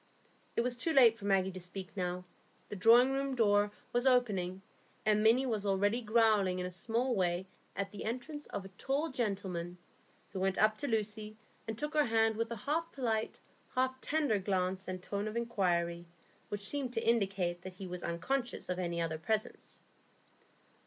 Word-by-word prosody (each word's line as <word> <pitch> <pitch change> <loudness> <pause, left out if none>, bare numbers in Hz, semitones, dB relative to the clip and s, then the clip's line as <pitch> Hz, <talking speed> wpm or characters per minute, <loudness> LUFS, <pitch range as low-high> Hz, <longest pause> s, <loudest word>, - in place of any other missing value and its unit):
It - - +3
was 245 +1 -1
too 320 +7 -1
late 240 -5 +7
for 200 - -8
Maggie 190 -1 +2
to 185 - -7
speak 185 +2 -7
now; 180 -1 -2 0.4
the - - -5
drawingroom 255 +7 +5
door 205 -3 +3 0.2
was 245 +2 +2
opening, 195 -7 +2 0.4
and 210 0 +4
Minny 230 +5 +5
was 220 -5 -1
already 205 +4 +2
growling 215 -4 +3
in 180 - -2
a 180 - -4
small 235 +7 0
way 180 -3 0 0.3
at 195 0 -2
the 205 - -7
entrance 255 +6 -4
of 195 - -5
a - - -9
tall 280 +4 0
gentleman, 190 -7 -2 0.5
who 195 - -4
went 190 0 +1
up 215 0 +4
to 285 - -2
Lucy 215 -2 -2 0.3
and 220 -1 -3
took 300 +5 -3
her 300 -1 +4
hand 225 -1 +3
with 230 +1 -1
a 235 - -3
half 330 +3 0
polite, 225 -5 -1 0.4
half 260 0 0
tender 290 -9 +1
glance 190 -1 -1
and 185 -1 -5
tone 200 +2 -3
of 215 +2 -3
inquiry, 175 -7 0 0.4
which 205 0 -2
seemed 270 -2 -2
to 225 -2 -2
indicate 195 -6 +1
that 185 0 -8
he 190 +1 -8
was 180 -1 -5
unconscious 235 +10 -2
of 180 0 -1
any 170 -1 -2
other 160 -1 -1
presence. 215 +6 -3
210 Hz, 180 wpm, -33 LUFS, 185-240 Hz, 0.5 s, late